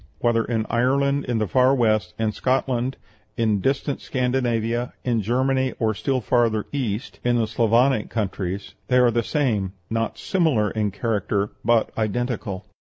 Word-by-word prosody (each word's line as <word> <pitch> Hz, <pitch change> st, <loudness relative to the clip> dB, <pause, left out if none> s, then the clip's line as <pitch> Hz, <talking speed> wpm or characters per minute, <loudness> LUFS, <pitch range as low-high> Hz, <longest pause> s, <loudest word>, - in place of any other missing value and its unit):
whether 115 Hz, -1 st, +2 dB
in 115 Hz, -2 st, -1 dB
Ireland, 140 Hz, +4 st, +1 dB
in 120 Hz, -2 st, -1 dB
the 110 Hz, -1 st, 0 dB
far 130 Hz, +7 st, +4 dB
west, 110 Hz, -6 st, +1 dB
in 110 Hz, -1 st, 0 dB
Scotland, 130 Hz, +1 st, 0 dB, 0.4 s
in 110 Hz, -4 st, +1 dB
distant 135 Hz, +3 st, -1 dB
Scandinavia, 120 Hz, -2 st, -1 dB
in 120 Hz, -3 st, +1 dB
Germany, 130 Hz, +4 st, +1 dB
or 110 Hz, -2 st, +1 dB
still 130 Hz, +4 st, -1 dB
farther 115 Hz, -2 st, +1 dB
east, 125 Hz, -5 st, -3 dB
in 120 Hz, 0 st, +2 dB
the 115 Hz, -, +2 dB
Sclavonic 115 Hz, +2 st, +2 dB
countries, 100 Hz, -3 st, -3 dB
they 125 Hz, -, +3 dB
are 125 Hz, -1 st, +5 dB
the 120 Hz, +1 st, +1 dB
same 110 Hz, -, 0 dB, 0.2 s
not 115 Hz, -1 st, -1 dB
similar 150 Hz, -, +1 dB
in 105 Hz, -2 st, 0 dB
character, 100 Hz, 0 st, -1 dB
but 115 Hz, 0 st, +2 dB
identical." 110 Hz, -2 st, -2 dB
120 Hz, 150 wpm, -23 LUFS, 110-130 Hz, 0.4 s, are